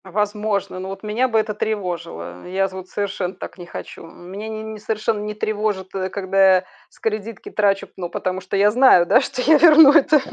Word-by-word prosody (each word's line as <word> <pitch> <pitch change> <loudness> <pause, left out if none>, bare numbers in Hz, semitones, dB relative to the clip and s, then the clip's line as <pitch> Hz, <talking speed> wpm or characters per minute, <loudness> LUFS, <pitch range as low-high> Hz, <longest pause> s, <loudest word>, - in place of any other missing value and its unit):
А 190 - -12
возможно. 210 -1 -2
Но 190 +1 -6
вот 195 +1 -8
меня 215 +5 0
бы 225 -3 0
это 215 0 -2
тревожило, 175 - -5
э. - - -10
Я 195 +1 +1
з 190 - -13
вот 185 -1 -9
совершенно 195 -2 -3
так 190 - -9
не 175 - -8
хочу. - - -9
Меня 190 +6 -9
не 220 0 -6
не 220 -1 -8
совершенно 215 0 -2
не 210 0 -5
тревожит, 210 -3 -3
э, 190 -1 -3
когда 195 -1 +3
я 185 - +1 0.3
с - - -25
кредитки 215 0 -4
трачу 200 -2 +1
п - - -35
ну 175 -2 -5
потому 185 +1 -3
что 185 +2 -3
я 205 +1 +4
знаю, 245 -7 +5
да, 230 +9 +4
что 265 -1 -4
я 310 +3 +5
верну 315 -3 +8
это. 295 +1 +5
205 Hz, 225 wpm, -20 LUFS, 190-220 Hz, 0.3 s, верну